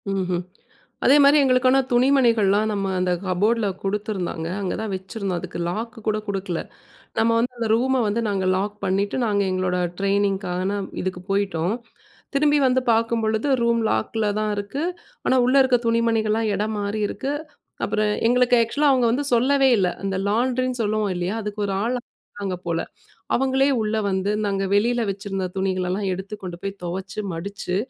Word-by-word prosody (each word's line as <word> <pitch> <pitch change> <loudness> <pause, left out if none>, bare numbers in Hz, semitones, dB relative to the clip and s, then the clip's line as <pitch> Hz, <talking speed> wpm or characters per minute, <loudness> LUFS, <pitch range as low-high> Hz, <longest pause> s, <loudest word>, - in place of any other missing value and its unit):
ம்ஹ்ம். 185 -2 -1 0.6
அதேமாதிரி, 285 +1 +7
எங்களுக்கான 255 0 +4
துணிமணிகள்லாம், 235 -5 +3
நம்ம 200 -2 -1
அந்த 180 0 +1
கபோர்ட்ல 205 +4 +1 0.2
குடுத்துருந்தாங்க. 195 -5 -2
அங்க 190 - -2
தான் 220 -2 -3
வச்சிருந்தோம். 190 -1 -4
அதுக்கு 170 - -7
லாக்கு 225 +5 -5
கூட 215 0 +2
குடுக்கல. 190 -4 -2 0.6
நம்ம 225 +1 +3
வந்து, 245 +2 0
அந்த 230 -1 -1
ரூம 260 +3 +2
வந்து, 215 +3 0
நாங்க 195 -2 -1
லாக் 205 +2 -2
பண்ணிட்டு, 200 +5 0
நாங்க 205 -2 +1
எங்களோட 185 -1 0 0.2
ட்ரெய்னிங்க்கான, 195 -1 0 0.2
இதுக்கு 185 -1 -4
போய்டோம். 195 -1 0 0.6
திரும்பி 295 +1 +4
வந்து 255 0 +2
பாக்கும்பொழுது, 225 +1 +1
ரூம் 235 0 +2
லாக்ல 210 - 0
தான் 215 0 0
இருக்கு. 205 +10 -3 0.4
ஆனா, 260 - +4
உள்ள 255 +2 +3
இருக்ற 255 -2 +3
துணிமணிகள்லாம், 225 -1 +1
எடம் 215 +2 -2
மாறி 205 +1 -2
இருக்கு. 275 - -3 0.5
அப்புறம் 215 0 0 0.2
எங்களுக்கு 250 0 +4
ஆக்சுவலா 285 +6 +1
அவுங்க 255 -2 +3
வந்து 280 +4 0
சொல்லவே 270 +3 +4
இல்ல. 185 -2 +2 0.2
அந்த 195 -1 -1
லாண்ட்ரினு 250 +2 0
சொல்லுவோம், 210 -2 0
இல்லையா? 180 +4 -2
அதுக்கு 210 0 -5
ஒரு 195 - -2
ஆள், 245 +2 0 0.4
இருக்காங்க 195 -3 -4
போல, 165 -1 0 0.5
அவுங்களே 270 +1 +2
உள்ள 215 0 -1
வந்து, 190 +1 0
நாங்க 195 -1 0
வெளியில 240 +4 +2
வச்சிருந்த 195 -1 -4
துணிகளெல்லாம், 190 +1 -1
எடுத்து 190 +3 -5
கொண்டு 180 -2 -6
போய் 195 - -3
தொவச்சு, 185 +3 -4
மடுச்சு, 185 +2 -4
210 Hz, 150 wpm, -23 LUFS, 195-235 Hz, 0.6 s, அதேமாதிரி